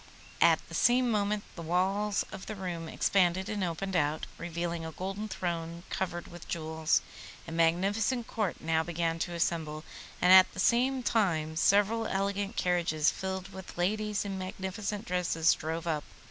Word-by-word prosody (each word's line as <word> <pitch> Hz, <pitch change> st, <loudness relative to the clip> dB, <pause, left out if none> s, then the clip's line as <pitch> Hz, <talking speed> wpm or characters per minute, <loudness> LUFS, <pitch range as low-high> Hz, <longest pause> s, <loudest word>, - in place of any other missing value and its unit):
At -, -, +4 dB
the -, -, -12 dB
same 245 Hz, 0 st, +3 dB
moment 205 Hz, -1 st, 0 dB
the 170 Hz, -, -7 dB
walls 190 Hz, +4 st, +1 dB
of 190 Hz, -, -8 dB
the 215 Hz, -, -4 dB
room 175 Hz, -4 st, -5 dB
expanded 190 Hz, 0 st, +2 dB
and 210 Hz, -3 st, -2 dB
opened 185 Hz, +2 st, -2 dB
out, 155 Hz, -2 st, +1 dB
revealing 170 Hz, 0 st, -3 dB
a 160 Hz, -, -5 dB
golden 195 Hz, +6 st, -4 dB
throne 170 Hz, -3 st, -4 dB
covered 175 Hz, -2 st, -2 dB
with 175 Hz, -1 st, -11 dB
jewels. 160 Hz, -1 st, 0 dB, 0.4 s
A -, -, -6 dB
magnificent 195 Hz, +9 st, +1 dB
Court 215 Hz, -6 st, -2 dB
now 160 Hz, 0 st, +1 dB
began 165 Hz, 0 st, -1 dB
to 175 Hz, +1 st, -2 dB
assemble, 160 Hz, -2 st, -1 dB, 0.4 s
and 180 Hz, +1 st, +6 dB
at 190 Hz, 0 st, +8 dB
the -, -, -6 dB
same 250 Hz, +6 st, +2 dB
time 165 Hz, -10 st, +1 dB
several 205 Hz, +6 st, +3 dB
elegant 200 Hz, +2 st, -1 dB
carriages 170 Hz, -4 st, +2 dB
filled 190 Hz, 0 st, -4 dB
with 190 Hz, -2 st, -9 dB
ladies 210 Hz, +3 st, 0 dB
in 195 Hz, -1 st, -4 dB
magnificent 195 Hz, +2 st, -4 dB
dresses 170 Hz, -2 st, +2 dB
drove 160 Hz, +1 st, -4 dB
up. 155 Hz, -3 st, -1 dB
180 Hz, 160 wpm, -30 LUFS, 165-200 Hz, 0.4 s, at